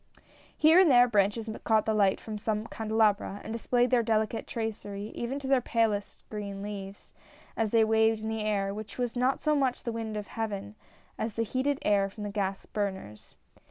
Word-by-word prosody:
Here 320 +3 +6
and 375 -4 +6
there, 245 -2 +7
branches 210 0 +1 0.2
caught 220 -2 +3
the 220 - +1
light 200 -3 +3
from 215 -1 -6
some 215 0 -1
candelabra 215 -3 0
and 220 - -5
displayed 245 +1 +1
their 245 -2 +4
delicate 220 0 0
tracery 210 -2 -4
even 245 +3 -3
to 280 -2 -6
their 265 -1 +3
palest 220 -4 -1
green 200 -2 -5
leaves, 200 -1 -8 0.4
as 225 -1 0
they 225 +1 +4
waved 220 0 +2
in - - -3
the 220 0 -2
air, 200 -2 0
which 215 +1 -8
was 245 -2 -2
not 255 +2 +1
so 305 0 +3
much 265 -3 0
the 235 - -2
wind 225 -2 -4
of 210 - -4
Heaven, 205 -2 -4 0.5
as 220 0 -2
the 230 - 0
heated 260 +5 0
air 200 -1 +2
from 210 +2 -9
the 205 - -4
gas 195 -1 -2
burners. 190 - -5
220 Hz, 195 wpm, -29 LUFS, 205-230 Hz, 0.5 s, there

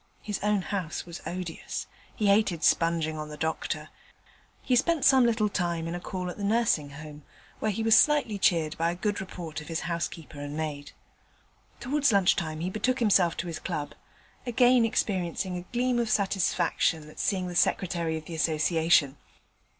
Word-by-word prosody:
His 210 -2 -3
own 210 -2 +1
house 185 -5 -4
was 170 -1 -9
odious; 180 -2 -5 0.3
he 215 - -1
hated 200 -5 +3
sponging 165 -2 +2
on 150 0 -6
the 150 - -8
doctor. 160 +1 -3 0.7
He 255 - +2
spent 295 +3 +2
some 260 -3 +6
little 220 -2 +2
time 170 -4 -2
in 165 - -4
a 175 - -3
call 185 0 -5
at - - -11
the 205 - -6
Nursing 205 -9 +1
Home, 150 +1 -10 0.4
where - - 0
he 215 +2 -2
was 225 0 +5
slightly 285 -9 +3
cheered 165 -5 +2
by 165 +1 +2
a 170 - -2
good 205 +3 -2
report 170 -4 -7
of 150 - -12
his 165 -1 -3
housekeeper 170 -3 -4
and 145 +1 -6
maid. 150 -2 -5 0.9
Towards 280 +2 +1
lunch 195 -3 +4
time 160 -3 -3
he 180 - -1
betook 250 +5 0
himself 195 -8 +3
to - - -3
his 165 - -5
club, 155 -5 -4 0.5
again 245 0 +4
experiencing 185 -4 -1
a 175 0 -8
gleam 245 0 +1
of 235 -2 0
satisfaction 190 -5 +1
at 155 - -13
seeing 185 -3 0
the 180 - -5
Secretary 170 -2 +1
of 155 - -9
the 170 - -8
Association. 160 -2 +2
180 Hz, 180 wpm, -27 LUFS, 160-215 Hz, 0.9 s, some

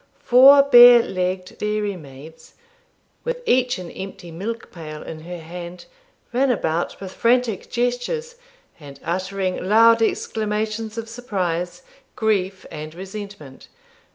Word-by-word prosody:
Four 270 +3 +8
bare 245 -3 +8
legged 185 -1 -4
dairy 210 -1 -2
maids, 155 +1 -14 0.7
with - - -4
each 250 - +2
an 180 -2 -8
empty 190 -3 -9
milk 220 +7 -6
pail 155 -3 -9
in 160 - -8
her 175 +3 -8
hand, 175 +2 -9 0.5
ran 265 +3 +2
about 170 -8 -1
with 190 -1 -8
frantic 235 -4 +1
gestures, 245 - -2 0.5
and 140 -2 -12
uttering 185 +2 -2
loud 230 +3 +5
exclamations 220 0 -2
of 230 0 -5
surprise, 185 - -3 0.3
grief, 195 -3 -1
and 155 0 -8
resentment. 190 -7 -9
200 Hz, 120 wpm, -21 LUFS, 175-230 Hz, 0.7 s, Four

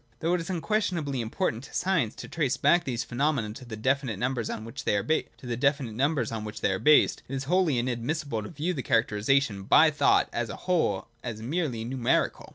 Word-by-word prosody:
Though 165 +2 0
it 180 - +1
is 165 - -7
unquestionably 170 - -1
important 115 +1 -2
to - - -12
science 165 - +1
to - - -8
trace 145 -6 -1
back 170 +4 +3
these 120 -3 -2
phenomena 125 -4 -1
to 125 +3 -11
the 115 -2 -7
definite 130 -1 0
numbers 125 0 -1
on 110 - -5
which 115 +4 -7
they 105 - +1
are 100 - -1
based, 160 0 -1 1.9
it 135 - -4
is 135 - -3
wholly 170 -2 +2
in 120 +1 0
admissible 125 +1 -2
to 105 - -7
view 165 +3 -2
the 140 - -3
characterisation 110 0 +1
by 155 +11 +5
thought 150 - +3
as 120 -2 -2
a - - -5
whole, 165 - +1
as 110 -3 -6
merely 130 -5 -2
numerical. 125 -1 0
135 Hz, 180 wpm, -27 LUFS, 115-160 Hz, 1.9 s, by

